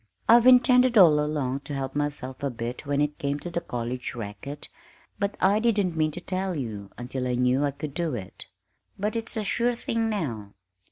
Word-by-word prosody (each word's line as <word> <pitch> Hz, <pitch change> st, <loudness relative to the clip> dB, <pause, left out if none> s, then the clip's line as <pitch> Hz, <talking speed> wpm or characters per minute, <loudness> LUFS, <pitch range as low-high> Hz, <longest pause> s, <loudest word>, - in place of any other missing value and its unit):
I've 235 Hz, +2 st, +7 dB
intended 250 Hz, -1 st, +6 dB
all 160 Hz, -6 st, +7 dB
along 140 Hz, -3 st, -1 dB
to 145 Hz, 0 st, -7 dB
help 135 Hz, 0 st, -4 dB
myself 145 Hz, -3 st, -3 dB
a 140 Hz, -, 0 dB
bit 120 Hz, +3 st, -6 dB
when 145 Hz, 0 st, +1 dB
it 150 Hz, 0 st, -1 dB
came 140 Hz, +1 st, -1 dB
to 175 Hz, -, -6 dB
the 170 Hz, -, -2 dB
college 125 Hz, -1 st, -4 dB
racket, 120 Hz, +6 st, -7 dB, 0.5 s
but 200 Hz, 0 st, -1 dB
I 200 Hz, +3 st, +4 dB
didn't 205 Hz, -6 st, +1 dB
mean 155 Hz, -1 st, +2 dB
to -, -, -5 dB
tell 185 Hz, 0 st, -3 dB
you 110 Hz, -8 st, -5 dB
until 125 Hz, +1 st, -4 dB
I 125 Hz, -, 0 dB
knew 125 Hz, +3 st, +2 dB
I 145 Hz, -, +2 dB
could 140 Hz, +1 st, -6 dB
do 165 Hz, -3 st, -2 dB
it. 95 Hz, -5 st, -8 dB, 0.5 s
But 210 Hz, +3 st, -2 dB
it's 225 Hz, 0 st, -3 dB
a 215 Hz, -, -1 dB
sure 240 Hz, +4 st, +1 dB
thing 230 Hz, -1 st, -1 dB
now. 120 Hz, -, -4 dB
145 Hz, 200 wpm, -26 LUFS, 125-200 Hz, 0.5 s, I've